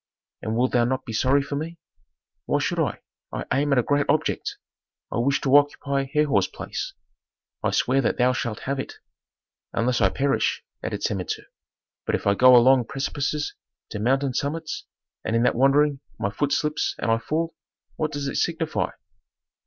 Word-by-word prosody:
"And 110 Hz, 0 st, -2 dB
wilt 125 Hz, +1 st, +2 dB
thou 120 Hz, -, +3 dB
not 130 Hz, +2 st, -1 dB
be 115 Hz, -, -6 dB
sorry 135 Hz, +5 st, +3 dB
for 140 Hz, -, -4 dB
me?" 165 Hz, +4 st, -4 dB, 0.7 s
"Why -, -, +2 dB
should -, -, -1 dB
I? -, -, -1 dB, 0.3 s
I -, -, -4 dB
aim 145 Hz, +2 st, +1 dB
at 140 Hz, -, +4 dB
a 125 Hz, -, +4 dB
great 145 Hz, +2 st, +1 dB
object; 155 Hz, +2 st, 0 dB, 0.5 s
I -, -, -2 dB
wish 140 Hz, +4 st, +2 dB
to 135 Hz, -1 st, +3 dB
occupy 140 Hz, -1 st, +2 dB
Herhor's 150 Hz, -11 st, +2 dB
place." -, -, -5 dB, 0.7 s
"I -, -, +1 dB
swear 135 Hz, +2 st, +2 dB
that -, -, 0 dB
thou 125 Hz, +1 st, +3 dB
shalt 115 Hz, -3 st, -3 dB
have 140 Hz, 0 st, -2 dB
it." -, -, -5 dB, 0.8 s
"Unless 120 Hz, +1 st, +1 dB
I 95 Hz, -, +5 dB
perish," 135 Hz, +6 st, 0 dB, 0.2 s
added -, -, -4 dB
Samentu. 95 Hz, -4 st, -2 dB, 0.6 s
"But -, -, +2 dB
if -, -, -4 dB
I 100 Hz, -, +4 dB
go 125 Hz, +4 st, +7 dB
along 125 Hz, 0 st, +6 dB
precipices 145 Hz, +3 st, -2 dB, 0.4 s
to 105 Hz, -, -4 dB
mountain 135 Hz, +4 st, +1 dB
summits, 155 Hz, +5 st, -3 dB, 0.4 s
and 110 Hz, -, -1 dB
in 115 Hz, -, +3 dB
that 125 Hz, -, +3 dB
wandering 140 Hz, +3 st, +3 dB, 0.2 s
my 100 Hz, -, -1 dB
foot 145 Hz, +8 st, -1 dB
slips 150 Hz, +1 st, 0 dB
and 115 Hz, -, 0 dB
I 115 Hz, -, +3 dB
fall, 165 Hz, +7 st, -2 dB, 0.4 s
what 155 Hz, -1 st, -1 dB
does 145 Hz, -1 st, -3 dB
it -, -, -2 dB
signify? 165 Hz, -2 st, 0 dB
135 Hz, 175 wpm, -24 LUFS, 120-145 Hz, 0.8 s, go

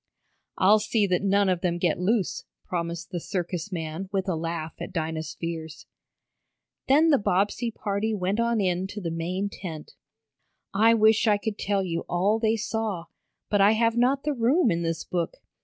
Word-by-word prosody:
"I'll 210 Hz, +3 st, +5 dB
see 215 Hz, 0 st, +1 dB
that 180 Hz, -2 st, +1 dB
none 200 Hz, 0 st, +3 dB
of 180 Hz, -2 st, +1 dB
them 175 Hz, -2 st, 0 dB
get 175 Hz, -2 st, 0 dB
loose," 200 Hz, +2 st, 0 dB, 0.2 s
promised 170 Hz, -1 st, -4 dB
the 175 Hz, -, -2 dB
circus 180 Hz, +2 st, -4 dB
man 165 Hz, +2 st, -4 dB
with 195 Hz, -1 st, -1 dB
a 185 Hz, -, 0 dB
laugh 165 Hz, -1 st, -4 dB
at -, -, -5 dB
Dinah's 160 Hz, -2 st, -3 dB
fears. 160 Hz, -2 st, -6 dB, 1.0 s
Then 300 Hz, +5 st, +5 dB
the 280 Hz, -, +5 dB
Bobbsey 205 Hz, +4 st, +1 dB
party 215 Hz, 0 st, -2 dB
went 195 Hz, +2 st, -1 dB
on 235 Hz, -1 st, +1 dB
in 185 Hz, -1 st, 0 dB
to 205 Hz, +1 st, -7 dB
the 170 Hz, -4 st, -3 dB
main 180 Hz, +4 st, -2 dB
tent. 165 Hz, -6 st, -8 dB, 0.8 s
I 225 Hz, +3 st, +5 dB
wish 220 Hz, 0 st, +4 dB
I 210 Hz, -1 st, +4 dB
could 210 Hz, 0 st, -4 dB
tell 200 Hz, -1 st, 0 dB
you 170 Hz, -2 st, -2 dB
all 200 Hz, +5 st, +2 dB
they 220 Hz, 0 st, +2 dB
saw, 220 Hz, -5 st, -3 dB, 0.4 s
but 205 Hz, -1 st, +2 dB
I 205 Hz, +2 st, +6 dB
have 230 Hz, +1 st, +2 dB
not 260 Hz, +3 st, +2 dB
the 300 Hz, -, 0 dB
room 250 Hz, -, +3 dB
in 170 Hz, 0 st, 0 dB
this 165 Hz, -1 st, -2 dB
book. 170 Hz, -2 st, -3 dB
195 Hz, 180 wpm, -26 LUFS, 170-220 Hz, 1.0 s, I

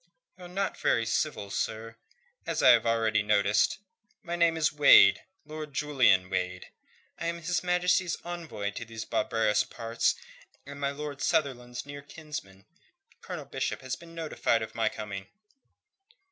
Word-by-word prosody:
"You're 180 Hz, -1 st, -11 dB
not 195 Hz, +3 st, -3 dB
very 115 Hz, -, +2 dB
civil, 115 Hz, -4 st, -2 dB
sir, 115 Hz, +1 st, -3 dB, 0.5 s
as -, -, -1 dB
I -, -, +8 dB
have 115 Hz, -1 st, +4 dB
already 115 Hz, -2 st, +2 dB
noticed. 105 Hz, 0 st, +2 dB, 0.5 s
My 170 Hz, -2 st, -3 dB
name 170 Hz, -1 st, +3 dB
is 155 Hz, -1 st, +1 dB
Wade 140 Hz, -9 st, +7 dB, 0.2 s
Lord 155 Hz, -1 st, -8 dB
Julian 130 Hz, -12 st, +3 dB
Wade. 90 Hz, -1 st, -3 dB, 0.5 s
I 170 Hz, -, -2 dB
am 170 Hz, 0 st, -2 dB
His 170 Hz, +1 st, -1 dB
Majesty's 180 Hz, 0 st, +1 dB
envoy 165 Hz, -13 st, -4 dB
to 110 Hz, -, -6 dB
these 115 Hz, -1 st, -7 dB
barbarous 110 Hz, -1 st, +1 dB
parts, 115 Hz, 0 st, -1 dB, 0.5 s
and 140 Hz, +1 st, -9 dB
my 140 Hz, -1 st, 0 dB
Lord 145 Hz, 0 st, -6 dB
Sunderland's 125 Hz, -7 st, -1 dB
near 145 Hz, 0 st, -8 dB
kinsman. 140 Hz, -11 st, -9 dB, 0.6 s
Colonel -, -, -7 dB
Bishop -, -, -3 dB
has 130 Hz, -1 st, -4 dB
been 165 Hz, +2 st, -14 dB
notified 155 Hz, -8 st, 0 dB
of 110 Hz, -, -8 dB
my 115 Hz, -1 st, +1 dB
coming." 100 Hz, -3 st, -7 dB
130 Hz, 145 wpm, -29 LUFS, 110-160 Hz, 0.6 s, I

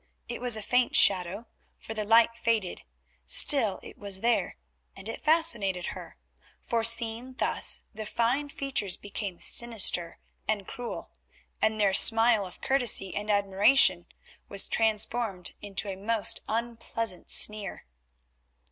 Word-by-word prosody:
It 240 Hz, 0 st, -6 dB
was 245 Hz, -3 st, +3 dB
a 215 Hz, -, -6 dB
faint 250 Hz, +3 st, 0 dB
shadow, 190 Hz, +3 st, +3 dB, 0.3 s
for 225 Hz, -, -9 dB
the 215 Hz, -1 st, -3 dB
light 230 Hz, +2 st, +4 dB
faded, 230 Hz, -5 st, -2 dB, 0.4 s
still 215 Hz, -, +3 dB
it -, -, -11 dB
was 200 Hz, -2 st, -2 dB
there, 230 Hz, -6 st, 0 dB, 0.4 s
and 195 Hz, -, -11 dB
it 225 Hz, -, -7 dB
fascinated 235 Hz, -, +1 dB
her, -, -, -11 dB, 0.4 s
for 230 Hz, -1 st, -2 dB
seen 230 Hz, +2 st, +1 dB
thus -, -, +1 dB
the 215 Hz, -1 st, -7 dB
fine 250 Hz, +7 st, -1 dB
features 265 Hz, -10 st, -3 dB
became 200 Hz, -3 st, -6 dB
sinister 215 Hz, -7 st, 0 dB, 0.3 s
and 205 Hz, -3 st, -2 dB
cruel, 245 Hz, -1 st, -8 dB, 0.5 s
and 220 Hz, 0 st, 0 dB
their 200 Hz, -2 st, +2 dB
smile 225 Hz, -1 st, +5 dB
of 180 Hz, -, -14 dB
courtesy 245 Hz, -8 st, 0 dB
and 210 Hz, +1 st, -5 dB
admiration 200 Hz, -1 st, +3 dB, 0.4 s
was 200 Hz, -1 st, +3 dB
transformed 220 Hz, -3 st, 0 dB
into 205 Hz, 0 st, -3 dB
a 195 Hz, -, -5 dB
most 210 Hz, +2 st, -1 dB
unpleasant 230 Hz, -3 st, -3 dB
sneer. 210 Hz, -1 st, 0 dB
220 Hz, 130 wpm, -27 LUFS, 195-235 Hz, 0.5 s, smile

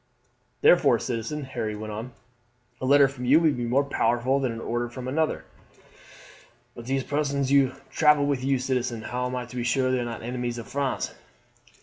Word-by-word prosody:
"Therefore, 145 Hz, -8 st, +5 dB
citizen," 125 Hz, +6 st, -4 dB
Harry 110 Hz, -5 st, -4 dB
went 110 Hz, 0 st, -6 dB
on, 115 Hz, +4 st, -6 dB, 0.7 s
"a 130 Hz, -, -1 dB
letter 140 Hz, 0 st, +6 dB
from 130 Hz, -2 st, -7 dB
you 140 Hz, +6 st, +6 dB
would 160 Hz, -4 st, +2 dB
be 120 Hz, -1 st, -3 dB
more 130 Hz, +4 st, +2 dB
powerful 130 Hz, 0 st, +1 dB
than 130 Hz, -3 st, -1 dB
an 115 Hz, -, -6 dB
order 120 Hz, +1 st, -2 dB
from 125 Hz, +1 st, -7 dB
another." 155 Hz, +4 st, -1 dB, 1.3 s
"But 120 Hz, -1 st, -10 dB
these 135 Hz, 0 st, 0 dB
persons 140 Hz, -2 st, -1 dB
who 135 Hz, -2 st, +4 dB, 0.2 s
travel 150 Hz, -2 st, +4 dB
with 140 Hz, -3 st, -1 dB
you, 135 Hz, 0 st, +2 dB
citizen 125 Hz, -3 st, -2 dB
how 125 Hz, +3 st, -2 dB
am 125 Hz, -, -4 dB
I 125 Hz, -1 st, -3 dB
to 120 Hz, -, -12 dB
be 120 Hz, -, -2 dB
sure 130 Hz, +1 st, +1 dB
they 130 Hz, -, +1 dB
are -, -, -1 dB
not 115 Hz, -1 st, -6 dB
enemies 120 Hz, 0 st, -3 dB
of 115 Hz, -, -7 dB
France?" 140 Hz, -1 st, -2 dB
130 Hz, 195 wpm, -26 LUFS, 120-140 Hz, 1.3 s, letter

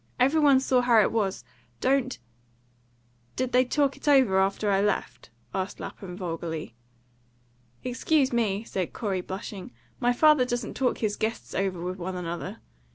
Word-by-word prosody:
"Every 275 Hz, +5 st, +4 dB
one 285 Hz, -3 st, +6 dB
saw 260 Hz, -1 st, +2 dB
how 240 Hz, -2 st, +5 dB
it -, -, +2 dB
was. 205 Hz, -4 st, -1 dB, 0.4 s
Don't 260 Hz, -1 st, +1 dB, 0.6 s
" 120 Hz, 0 st, -38 dB
"Did 255 Hz, -1 st, -1 dB
they 250 Hz, +1 st, +5 dB
talk 280 Hz, +1 st, +1 dB
it -, -, -12 dB
over 260 Hz, -10 st, +5 dB
after 195 Hz, +2 st, +1 dB
I 195 Hz, 0 st, +3 dB
left?" 160 Hz, -, -2 dB, 0.2 s
asked 190 Hz, 0 st, -3 dB
Lapham 180 Hz, -2 st, -8 dB
vulgarly. 165 Hz, -, -4 dB, 1.1 s
"Excuse 260 Hz, +2 st, +1 dB
me," 215 Hz, -3 st, 0 dB
said 185 Hz, -6 st, -3 dB
Corey, 195 Hz, -5 st, -2 dB
blushing, 195 Hz, +4 st, -7 dB, 0.3 s
"my 245 Hz, -1 st, +3 dB
father 300 Hz, +1 st, +5 dB
doesn't 240 Hz, -2 st, -3 dB
talk 260 Hz, -2 st, 0 dB
his 210 Hz, -2 st, -1 dB
guests 225 Hz, +1 st, -3 dB
over 190 Hz, -2 st, -1 dB
with 180 Hz, +2 st, -4 dB
one 185 Hz, +1 st, -4 dB
another." 180 Hz, +4 st, -5 dB
210 Hz, 160 wpm, -27 LUFS, 185-255 Hz, 1.1 s, one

